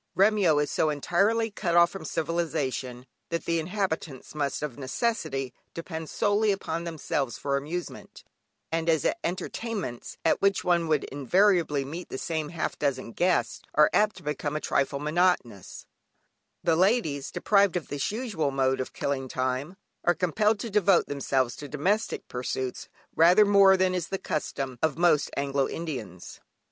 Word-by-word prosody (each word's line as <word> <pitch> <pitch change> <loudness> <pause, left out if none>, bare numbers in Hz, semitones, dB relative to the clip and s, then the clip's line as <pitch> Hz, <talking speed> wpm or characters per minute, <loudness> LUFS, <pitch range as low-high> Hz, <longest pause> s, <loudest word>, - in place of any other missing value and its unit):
Remyo 195 -5 +4
is 145 0 0
so 155 - +2
entirely 200 +10 +1
cut 175 -4 -1
off 170 0 +6
from 195 -5 -8
civilisation, 150 -7 -2 0.2
that 170 0 -3
the 165 0 +1
inhabitants 165 -6 -3
must 145 -1 -2
of 145 -5 -4
necessity 135 - -2 0.2
depend 160 -1 -6
solely 210 0 +2
upon 170 -3 -3
themselves 150 -6 -2
for 140 -1 -1
amusement, 160 +6 -5 0.5
and 165 0 0
as 160 -3 +2 0.2
entertainments, 185 - -4
at - - +3
which 200 0 +2
one 170 -2 +2
would 155 -2 +2
invariably 155 0 +2
meet 165 +6 -7
the - - -5
same 155 0 -3
half 165 -2 -3
dozen 130 -4 -1
guests 180 +7 0
are 150 0 +5
apt 210 0 +3
to 185 - -13
become 150 0 -3
a - - 0
trifle 140 -1 0
monotonous, 150 - 0 0.8
the 165 - +3
ladies, 175 - +1
deprived 200 -3 +2
of 170 - -6
this 145 +4 -2
usual 210 - -2
mode 135 -1 +1
of 130 - -4
killing 135 -2 -2
time, 130 +7 -2 0.3
are 175 - +3
compelled 210 +5 +1
to 230 - -5
devote 195 -3 +4
themselves 135 -3 -1
to 145 - -8
domestic 190 +10 -1
pursuits 125 0 -4 0.3
rather 180 +6 +6
more 200 -1 +6
than 185 0 +2
is 175 -2 -2
the 195 - -2
custom 135 -7 -4
of 160 - +1
most 170 -4 +3
Anglo 140 -1 0
Indians. 125 - -6
160 Hz, 155 wpm, -27 LUFS, 140-185 Hz, 0.8 s, off